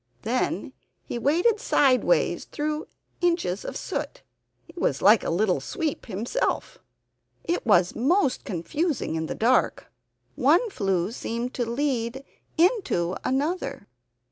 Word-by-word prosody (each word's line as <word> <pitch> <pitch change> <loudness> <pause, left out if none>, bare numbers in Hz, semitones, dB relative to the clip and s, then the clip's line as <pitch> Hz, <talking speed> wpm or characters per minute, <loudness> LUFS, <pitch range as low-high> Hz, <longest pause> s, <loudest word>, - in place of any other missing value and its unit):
Then - - -1 0.3
he 240 - -5
waded 350 - +2
sideways 275 - +2
through 300 +1 -3 0.3
inches 335 - 0
of - - -5
soot. - - -5 0.4
He - - -15
was 140 - 0
like 210 +1 +6
a - - -2
little 180 +2 +1
sweep 320 -9 -3
himself. 230 - -2 0.6
It 345 -7 -2
was 180 -4 +4
most 280 - +2
confusing 260 - -2
in 160 0 -2
the - - -4
dark. 245 +3 +1 0.4
One 470 -4 +3
flue 195 - 0
seemed 235 +1 -4
to 240 -2 -2
lead 250 -1 -1 0.3
into 330 - +2
another. 295 +8 -1
255 Hz, 120 wpm, -25 LUFS, 205-330 Hz, 0.6 s, like